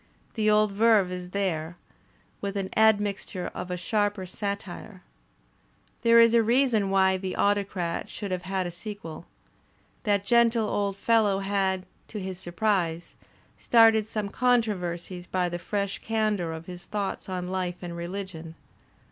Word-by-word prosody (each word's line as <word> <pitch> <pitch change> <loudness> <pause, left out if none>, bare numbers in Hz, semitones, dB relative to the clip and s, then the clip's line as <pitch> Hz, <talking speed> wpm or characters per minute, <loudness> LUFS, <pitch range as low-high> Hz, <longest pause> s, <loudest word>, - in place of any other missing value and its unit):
The 215 -1 +1
old 210 -1 +4
verve 210 -2 +4
is 180 -1 -6
there, 175 -4 -2 0.6
with 200 0 -3
an 190 -1 -3
admixture 205 -4 +1
of 180 - -6
a 180 - -2
sharper 205 +1 0
satire. 200 0 -6 1.0
There 230 -1 +6
is 230 0 +6
a 235 - +6
reason 230 -3 +2
why 190 -1 +3
"The 185 0 -4
Autocrat" 195 -4 0
should 205 -3 -6
have 180 -1 -1
had 190 0 -2
a 175 - -4
sequel. 175 -2 -8 0.7
That 200 -2 +1
gentle 235 -1 +4
old 200 -1 -1
fellow 210 -2 +3
had, 195 -1 0 0.2
to 215 - -6
his 185 -1 -5
surprise, 175 -2 -1 0.4
started 225 -2 +5
some 210 -2 -3
con 245 +1 +3
troversies 180 -3 -5
by 180 -1 0
the 175 0 -4
fresh 200 +1 -2
candour 215 -6 0
of 160 0 -7
his 180 -1 -9
thoughts 200 -1 -4
on 180 -1 -3
life 185 -2 -2
and 175 -1 -5
reUgion. 170 -2 -6
195 Hz, 150 wpm, -27 LUFS, 180-215 Hz, 1.0 s, There